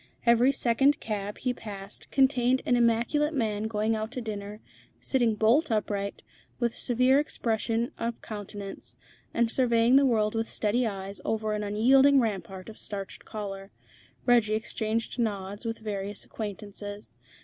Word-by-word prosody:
Every 235 +3 +5
second 270 +3 +2
cab 205 -2 -4
he 250 -1 -1
passed 200 -4 -8
contained 260 -2 +3
an 245 - +3
immaculate 240 +6 +2
man 215 -4 0
going 220 0 0
out 220 +1 -3
to - - -3
dinner, 210 -1 -6 0.4
sitting 240 -5 +1
bolt 230 +10 +3
upright, 205 -2 -2 0.4
with 235 -2 +1
a - - -14
severe 255 +3 +3
expression 230 -3 -1
of 230 0 -2
countenance, 205 -2 -8 0.4
and 230 -1 +1
surveying 240 0 +4
the 280 - +5
world 215 -3 +2
with 225 0 -2
steady 230 +3 +1
eyes 195 -1 -6
over 215 -1 -1
an 210 - -2
unyielding 265 +7 +5
rampart 190 -5 -3
of 220 - -10
starched 195 -2 -6
collar. 195 -2 -6 0.6
Reggie 235 -4 +4
exchanged 220 +2 -2
nods 205 -1 -2
with 225 0 -2
various 205 -2 -4
acquaintances. 205 - -7
220 Hz, 145 wpm, -28 LUFS, 205-240 Hz, 0.6 s, Every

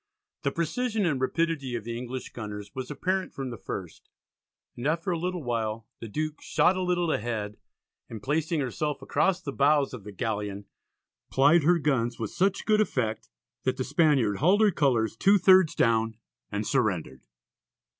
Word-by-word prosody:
The 140 - +1
precision 215 - -1
and 145 -6 0
rapidity 140 -2 0
of 115 - -4
the 115 +1 -5
English 125 +2 -6
gunners 105 -3 -7
was 130 -1 -5
apparent 185 +6 -2
from 135 -2 -4
the 120 - -6
first, 90 -4 -7 0.7
and 120 +3 -3
after 165 +4 0
a 170 - -1
little 180 -1 -3
while 115 -2 -2
the 115 - -7
Duke 155 +7 -3
"shot 185 - +3
a 185 - -2
little 175 -2 +1
ahead" 105 -4 -3 0.5
and 110 -3 -8
placing 155 +2 0
herself 145 +3 -3
across 185 -1 +1
the 140 - -3
bows 140 0 +3
of 120 -5 -7
the 105 - -8
galleon, 105 -1 -3 0.6
plied 145 +6 +5
her 170 +4 +4
guns 130 -6 0
with 110 - -4
such 190 +3 0
good 215 -1 +4
effect 115 - -1 0.3
that 130 - -1
the 130 - -1
Spaniard 140 - +2
hauled 185 - +4
her 215 -2 +5
colours 120 - +1
"two 200 - +5
thirds 185 -3 +5
down" 115 -1 +2 0.3
and 105 +1 -2
surrendered. 90 - -1
135 Hz, 170 wpm, -27 LUFS, 115-170 Hz, 0.7 s, plied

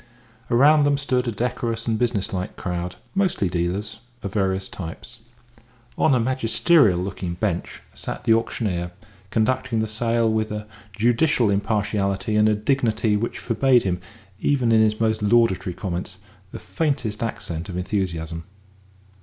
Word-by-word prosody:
Around 145 +5 +5
them 145 0 +3
stood 130 -3 0
a - - +1
decorous 115 +1 -2
and 110 -1 0
businesslike 100 -6 -1
crowd, 90 0 -4 0.2
mostly 190 - +1
dealers, 95 +5 -2 0.2
of 100 - -4
various 95 -2 0
types. 95 +7 -8 0.8
On 140 - +3
a - - +2
magisterial 120 - +3
looking 90 -2 -4
bench 90 -2 -3
sat - - -6
the 115 - +4
auctioneer, 95 -6 -1 0.4
conducting 115 +2 0
the 110 - +1
sale 115 +1 +1
with 110 -1 0
a 105 0 -4 0.3
judicial 120 +1 +3
impartiality 100 0 0
and 105 0 +2
dignity 115 -5 +2
which 110 +3 -2
forbade 125 +1 +3
him, 90 -2 -1 0.4
even 125 -3 +2
in 110 -1 +5
his 110 0 +2
most 110 -1 +1
laudatory 105 -5 +2
comments, 90 -2 -4 0.3
the - - -6
faintest 135 -9 -2
accent 90 -6 -4
of 90 - -5
enthusiasm. 85 -4 -3
110 Hz, 135 wpm, -23 LUFS, 95-120 Hz, 0.8 s, Around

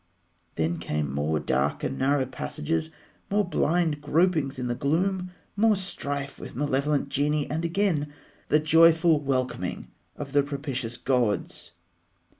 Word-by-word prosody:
Then 80 +1 0
came 75 -4 -2
more 75 +2 0
dark 70 0 0
and 135 - -1
narrow 135 0 +2
passages, 155 +5 -3 0.4
more 205 +1 +2
blind 165 -4 +1
gropings 155 -2 +1
in 125 - -3
the 120 - 0
gloom, 180 +8 0 0.3
more 215 +1 +4
strife 145 -7 -4
with - - -9
malevolent 140 +1 0
genii, 145 +1 0
and 160 +3 -1
again 170 -4 0 0.4
the 150 - +4
joyful 165 +1 +5
welcoming 130 -3 -2 0.2
of 140 -1 -7
the 145 - +5
propitious 135 -4 -4
gods. 120 -7 -1
145 Hz, 130 wpm, -26 LUFS, 130-165 Hz, 0.4 s, joyful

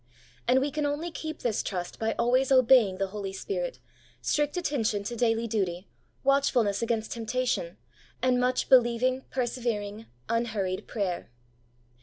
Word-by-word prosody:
And 255 +2 +5
we 285 +1 0
can 300 0 0
only 305 +4 -2
keep 315 0 -6
this 230 -4 +1
trust 180 -3 -4
by 225 0 0
always 255 +3 +2
obeying 250 -7 +5
the 195 0 -1
Holy 200 -2 -4
Spirit, - - -3 0.4
strict 295 +2 0
attention 230 - 0
to 235 +4 -4
daily 230 -1 +1
duty, 195 -5 -2 0.4
watchfulness 265 -7 +2
against 230 -2 -1
temptation, 230 -6 -2 0.4
and 250 0 +2
much 250 0 +1
believing, 255 +1 +4
persevering, 230 -4 -2 0.2
unhurried 215 -5 -1
prayer. 190 -6 -3
235 Hz, 135 wpm, -28 LUFS, 210-260 Hz, 0.4 s, And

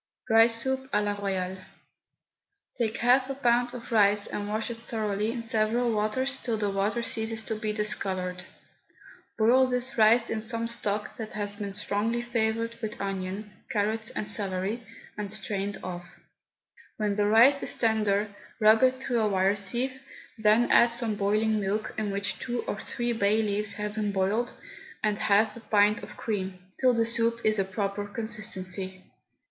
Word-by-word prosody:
RICE 230 +1 +5
SOUP 265 0 -2
A 210 - +3
LA 205 - 0
ROYALE. 190 -2 -3 1.2
Take 230 -2 -1
half 255 +2 +3
a 275 - -3
pound 245 -2 +1
of 240 -1 -9
rice 205 -2 +4
and 205 0 -4
wash 215 +2 -2
it 230 - -6
thoroughly 215 -2 -2
in 235 -1 -5
several 230 +2 +1
waters 260 +6 -1
till 230 -3 -2
the 205 -1 -1
water 205 +4 -1
ceases 225 -1 +1
to 220 - -3
be 215 0 -3
discoloured. 190 -4 0 0.9
Boil 245 +4 +5
this 250 -1 -2
rice 230 +2 +5
in 220 - -2
some 230 +1 0
stock 210 -2 -2
that 220 -3 -6
has 205 -1 -3
been 200 -2 -5
strongly 210 +3 -1
flavoured 230 -1 -1
with 215 -2 -5
onion, 195 +1 -4 0.2
carrot 220 +2 0
and 210 - -3
celery, 200 +2 -2 0.4
and 205 -1 -3
strained 200 -1 -3
off. 175 -1 -8 0.8
When 210 -2 0
the 205 0 +1
rice 245 +6 +6
is - - 0
tender 210 -2 +1 0.3
rub 220 0 +6
it 260 0 +4
through 255 -2 -2
a 215 -1 +2
wire 190 0 +2
sieve, 240 +6 -2 0.3
then 220 +1 +3
add 235 - +7
some 235 -2 -1
boiling 215 +2 +1
milk, 205 +2 -2
in 215 -1 -2
which 200 0 -2
two 240 -1 -3
or 205 - -4
three 240 0 -1
bay 215 0 +2
leaves 210 0 0
have 210 0 -4
been 210 -1 -1
boiled, 200 +5 0 0.5
and 210 -1 0
half 210 0 +3
a - - -9
pint 210 -1 +2
of - - -11
cream, 190 -4 -3 0.2
till 255 -2 +4
the 230 0 +2
soup 230 0 +2
is 215 -1 +3
a - - +3
proper 200 +1 -3
consistency. 195 -4 -2
215 Hz, 170 wpm, -27 LUFS, 205-230 Hz, 1.2 s, add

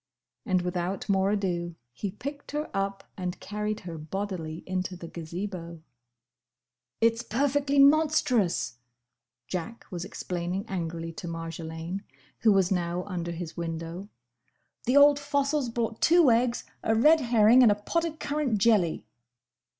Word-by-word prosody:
And 185 -1 +2
without 180 +1 -2
more 195 0 +3
ado, 175 -4 -1 0.2
he 200 - -4
picked 280 +9 -7
her 300 +1 -3
up 195 0 -2
and 180 -1 -4
carried 210 0 -3
her 170 -3 -7
bodily 165 -1 -4
into 185 0 -2
the 170 -1 -8
Gazebo. 170 0 -6 1.2
"It's 230 0 +3
perfectly 280 +4 0
monstrous!" 275 - +3 0.7
Jack 185 +6 -5
was 175 -2 -4
explaining 180 +2 -4
angrily 165 -4 -4
to 175 - -7
Marjolaine, 165 +2 -5 0.4
who 220 - +5
was 195 -2 +3
now 175 -1 0
under 180 -4 -4
his 170 -1 -6
window. 165 +3 -5 0.8
"The 255 +4 +3
old 285 0 +7
fossil's 285 -2 0
brought 230 -1 -3
two 335 -5 +6
eggs, 235 +1 +2 0.2
a 220 - +1
red 305 +8 +6
herring, 235 0 +5
and 235 -4 +7
a - - +3
pot 265 +11 -1
of 325 -2 -3
currant 285 -7 -1
jelly!" 190 - +2
195 Hz, 135 wpm, -28 LUFS, 175-240 Hz, 1.2 s, old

